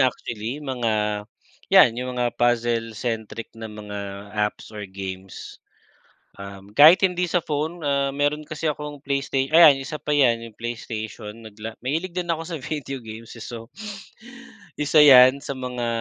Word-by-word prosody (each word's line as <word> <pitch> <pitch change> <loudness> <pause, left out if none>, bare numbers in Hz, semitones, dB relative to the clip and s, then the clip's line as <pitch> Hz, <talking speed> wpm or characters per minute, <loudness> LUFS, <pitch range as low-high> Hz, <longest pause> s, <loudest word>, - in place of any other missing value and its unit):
actually 120 0 -1
mga 110 -6 -1 0.5
yan 115 - +7
yung 125 +1 -4
mga 120 -1 -1
puzzle 120 -1 +1
centric 115 0 -4
na 110 0 -7
mga 100 -1 -7
apps 105 0 -2
or 105 -1 -6
games. 95 -1 -8 0.8
Um, 100 0 -10
kahit 160 - +8
hindi 180 -1 0
sa 175 0 +1
phone 155 +3 -3
ah, 140 -1 +1
meron 145 +1 0
kasi 155 +1 -6
akong 150 -1 -6
playstay 140 -1 -1
ayan 160 -3 +8
isa 150 +3 -6
pa 150 - -2
yan 125 -5 +4
yung 110 - -16
PlayStation 110 -2 -6
nagla 110 +1 -8
mahilig 165 +7 -2
din 180 -1 -3
ako 165 - -2
sa 170 -2 -4
video 135 -2 -5
games 110 +1 -10
eh, 115 - -9
so 115 -1 -8 1.1
isa 150 +1 +4
yan 130 -2 +8
sa 140 -1 -6
mga 125 -2 -4
125 Hz, 155 wpm, -23 LUFS, 110-145 Hz, 1.1 s, kahit